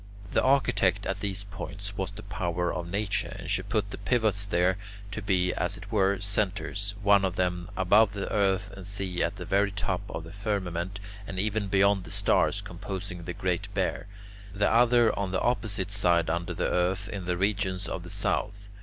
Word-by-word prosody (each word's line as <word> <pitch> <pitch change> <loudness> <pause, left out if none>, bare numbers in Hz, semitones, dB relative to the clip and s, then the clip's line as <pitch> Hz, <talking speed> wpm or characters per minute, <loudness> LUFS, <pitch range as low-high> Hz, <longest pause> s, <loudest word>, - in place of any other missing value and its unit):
The - - +3
architect 100 -8 +3
at 95 0 -2
these 100 -1 -1
points 100 +1 -7
was 95 -2 -2
the 100 +1 -10
power 90 -3 -1
of 85 -1 -4
Nature, 100 +1 -1
and 90 - -8
she 95 0 +1
put 100 +1 -1
the - - -6
pivots 100 -1 +1
there, 90 0 +2 0.3
to 110 - -4
be, 90 -2 +2
as 90 - -1
it 100 +3 -11
were, 100 -2 +3
centres, 100 0 -1
one 100 -1 +6
of 95 -2 0
them 90 0 -1
above 100 +2 +5
the 100 -1 -3
earth 100 0 +2
and 95 -1 -9
sea 95 -3 -3
at - - 0
the - - -7
very 100 +1 +3
top 95 -2 -2
of 80 - -5
the 85 - -10
firmament 100 -2 -2 0.3
and 95 - -6
even 105 +1 0
beyond 100 0 +3
the 85 - -10
stars 100 +4 +2
composing 95 -1 -6
the 90 - -4
Great 90 -2 -2
Bear, - - -1 0.5
the 105 0 +2
other 120 -1 +5
on 100 -2 -1
the 95 - 0
opposite 105 -6 -1
side 85 -5 +3
under 85 +1 -2
the - - 0
earth 95 +2 +1
in 95 -3 -5
the 90 0 0
regions 95 -1 0
of - - -4
the - - -9
south. 100 -1 -1
100 Hz, 195 wpm, -28 LUFS, 90-100 Hz, 0.5 s, one